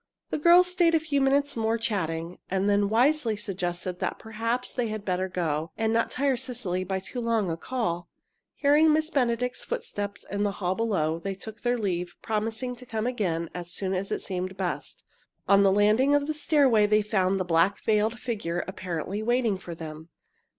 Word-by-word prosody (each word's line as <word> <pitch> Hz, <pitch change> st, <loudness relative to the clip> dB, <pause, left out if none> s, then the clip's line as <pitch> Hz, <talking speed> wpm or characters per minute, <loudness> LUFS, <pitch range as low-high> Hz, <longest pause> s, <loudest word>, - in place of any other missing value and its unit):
The -, -, -1 dB
girls 345 Hz, +3 st, +7 dB
stayed 355 Hz, -2 st, +3 dB
a -, -, +4 dB
few 295 Hz, -3 st, 0 dB
moments 280 Hz, +1 st, +2 dB
more, 225 Hz, 0 st, +1 dB
chatting. 175 Hz, -6 st, -2 dB
Then 190 Hz, +1 st, 0 dB
they 205 Hz, 0 st, +4 dB
wisely 225 Hz, +3 st, +2 dB
suggested 180 Hz, -3 st, -4 dB
that -, -, -2 dB
perhaps 230 Hz, +3 st, -3 dB
they 245 Hz, -2 st, -1 dB
had 215 Hz, -1 st, -5 dB
better 185 Hz, 0 st, -1 dB
go, 160 Hz, -3 st, -1 dB
and 225 Hz, 0 st, +1 dB
not 230 Hz, 0 st, +2 dB
tire 270 Hz, -1 st, +1 dB
Cecily 235 Hz, -8 st, -3 dB
by 190 Hz, +1 st, -2 dB
too 245 Hz, +6 st, -5 dB
long 225 Hz, -6 st, +1 dB
a -, -, -1 dB
call. 175 Hz, -4 st, -3 dB, 0.5 s
Hearing 300 Hz, +2 st, +4 dB
Miss 310 Hz, +1 st, +1 dB
Benedict's 250 Hz, -3 st, 0 dB
footstep 200 Hz, 0 st, -4 dB
in 200 Hz, 0 st, -1 dB
the 205 Hz, -1 st, +1 dB
hall 185 Hz, -2 st, -1 dB
below, 185 Hz, -8 st, 0 dB
they 195 Hz, +2 st, -4 dB
took 220 Hz, +3 st, -9 dB
their 245 Hz, 0 st, +1 dB
leave, 180 Hz, -5 st, -2 dB
promising 225 Hz, +3 st, -2 dB
to 250 Hz, -, -12 dB
come 220 Hz, -1 st, -2 dB
again, 180 Hz, -10 st, -1 dB
as 175 Hz, -1 st, -6 dB
soon 190 Hz, 0 st, -2 dB
as 190 Hz, +1 st, -2 dB
it -, -, -2 dB
seemed 185 Hz, 0 st, -4 dB
best. 185 Hz, -2 st, -4 dB, 0.4 s
On 200 Hz, 0 st, +6 dB
the 195 Hz, -1 st, +5 dB
landing 215 Hz, +8 st, +4 dB
of 290 Hz, 0 st, +2 dB
the 310 Hz, -, -1 dB
stairway 275 Hz, -8 st, +4 dB
they 215 Hz, 0 st, +3 dB
found 195 Hz, -2 st, +1 dB
the 185 Hz, -, -1 dB
black 175 Hz, +3 st, +2 dB
veiled 220 Hz, +2 st, +1 dB
figure 200 Hz, -9 st, -2 dB
apparently 185 Hz, +1 st, -4 dB
waiting 240 Hz, -2 st, +1 dB
for 175 Hz, -3 st, -8 dB
them. 160 Hz, 0 st, -8 dB
210 Hz, 190 wpm, -27 LUFS, 185-245 Hz, 0.5 s, girls